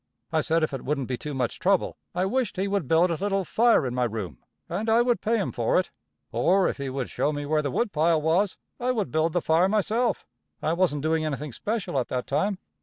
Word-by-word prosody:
I 160 -1 +2
said 165 +1 +1
if 155 - -1
it 135 - -4
wouldn't 140 -3 -1
be 130 - -1
too 145 +3 -6
much 125 -3 -2
trouble, 190 0 +2 0.2
I 180 +1 +1
wisht 250 +4 -1
he 190 +2 0
would 195 -7 -1
build 165 +4 +4
a 165 - -3
little 195 -1 0
fire 230 - +3
in 125 - -2
my 125 0 +1
room, 105 - -5 0.3
and 205 +6 -2
I 230 +2 +5
would 240 -1 +1
pay 230 +1 +1
him 200 - -1
for 120 +6 +2
it; 185 - -3 0.4
or, 180 +12 +3
if - - -2
he 140 -1 -4
would 130 -1 -4
show 150 - 0
me 145 -1 -4
where 155 +1 +1
the 145 - -2
woodpile 165 - +2
was, 170 +6 +1 0.2
I 250 +1 +1
would 215 -5 -2
build 160 +1 +1
the 175 - 0
fire 165 +4 +3
myself 215 +3 0 0.3
I 160 - 0
wasn't 170 -5 +1
doing 160 0 +1
anything 150 -1 -3
special 205 - -2
at 125 - -2
that 125 -1 -2
time. 195 +8 0
165 Hz, 240 wpm, -26 LUFS, 140-200 Hz, 0.4 s, I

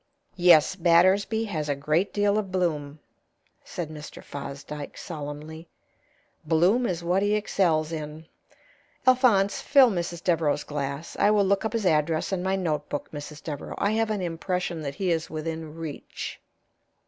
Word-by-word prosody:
"Yes, 175 -2 +5
Battersby 185 +5 +3
has 155 -8 -3
a 145 - +1
great 155 +7 0
deal 205 0 +2
of 195 -3 -5
bloom," 155 -6 -1 0.7
said 165 -3 -5
Mr. 150 -1 -9
Fosdyke, 140 +1 -7
solemnly. 155 +1 -7 0.8
"Bloom 190 +10 +3
is 170 -2 -3
what 180 +3 +2
he 205 +1 +2
excels 170 -6 +1
in. 155 0 -6 0.8
Alphonse, 245 -7 +4
fill 270 -4 +6
Mrs. 170 -2 -3
Devereaux's 160 -4 +1
glass. 140 +1 -4
I 205 - +5
will 210 -1 +4
look 200 +2 +1
up 220 - -2
his 225 -3 -1
address 160 +1 +1
in 185 - 0
my 190 +1 0
notebook, 150 -5 -3
Mrs. 150 0 -8
Devereaux. 145 -3 -6
I 205 - +1
have 225 0 +1
an 210 -3 -1
impression 175 0 -2
that 140 -2 -5
he 185 +1 0
is 165 -1 -1
within 160 0 -5
reach." 160 -3 -7
170 Hz, 150 wpm, -26 LUFS, 150-195 Hz, 0.8 s, fill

